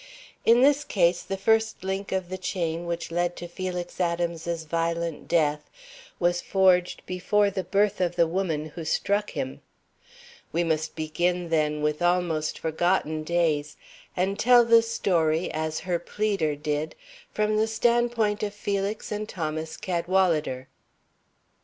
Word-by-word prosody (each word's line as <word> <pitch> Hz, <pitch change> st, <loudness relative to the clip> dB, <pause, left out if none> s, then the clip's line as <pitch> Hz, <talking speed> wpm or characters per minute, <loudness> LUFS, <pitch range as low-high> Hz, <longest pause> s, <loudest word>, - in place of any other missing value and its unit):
In 235 Hz, +2 st, +6 dB
this 285 Hz, +2 st, +4 dB
case, 175 Hz, -6 st, +2 dB
the 195 Hz, -, -4 dB
first 220 Hz, 0 st, +1 dB
link 190 Hz, +1 st, -3 dB
of 185 Hz, -2 st, -2 dB
the 185 Hz, -, -4 dB
chain 170 Hz, -2 st, -2 dB
which 170 Hz, -1 st, -4 dB
led 175 Hz, +1 st, 0 dB
to 175 Hz, -, -7 dB
Felix 180 Hz, 0 st, -5 dB
Adams's 170 Hz, -1 st, -1 dB
violent 165 Hz, 0 st, -2 dB
death 150 Hz, -3 st, +1 dB, 0.5 s
was 175 Hz, 0 st, +1 dB
forged 185 Hz, -2 st, +2 dB
before 200 Hz, +3 st, +1 dB
the 190 Hz, -1 st, -3 dB
birth 200 Hz, +2 st, +1 dB
of 175 Hz, -1 st, 0 dB
the 170 Hz, -, +4 dB
woman 165 Hz, -3 st, -2 dB
who 165 Hz, +2 st, -7 dB
struck 205 Hz, +6 st, 0 dB
him. 265 Hz, -1 st, -5 dB, 0.9 s
We 170 Hz, -, +1 dB
must 160 Hz, -1 st, -1 dB
begin, 175 Hz, +3 st, -1 dB
then, 150 Hz, -2 st, +1 dB
with 150 Hz, +2 st, 0 dB
almost 175 Hz, -3 st, +1 dB
forgotten 160 Hz, -1 st, 0 dB
days, 155 Hz, -3 st, 0 dB, 0.4 s
and 190 Hz, +2 st, 0 dB
tell 245 Hz, 0 st, +6 dB
the 230 Hz, 0 st, +6 dB
story, 175 Hz, -8 st, 0 dB
as 155 Hz, 0 st, -2 dB
her 175 Hz, 0 st, -1 dB
pleader 195 Hz, -9 st, -1 dB
did, 150 Hz, +1 st, -3 dB, 0.4 s
from 215 Hz, 0 st, +1 dB
the 220 Hz, +1 st, +2 dB
standpoint 230 Hz, -1 st, +1 dB
of 205 Hz, -1 st, -3 dB
Felix 200 Hz, +1 st, -2 dB
and 210 Hz, +1 st, -3 dB
Thomas 160 Hz, -1 st, -4 dB
Cadwalader. 170 Hz, -7 st, 0 dB
175 Hz, 140 wpm, -26 LUFS, 160-200 Hz, 0.9 s, In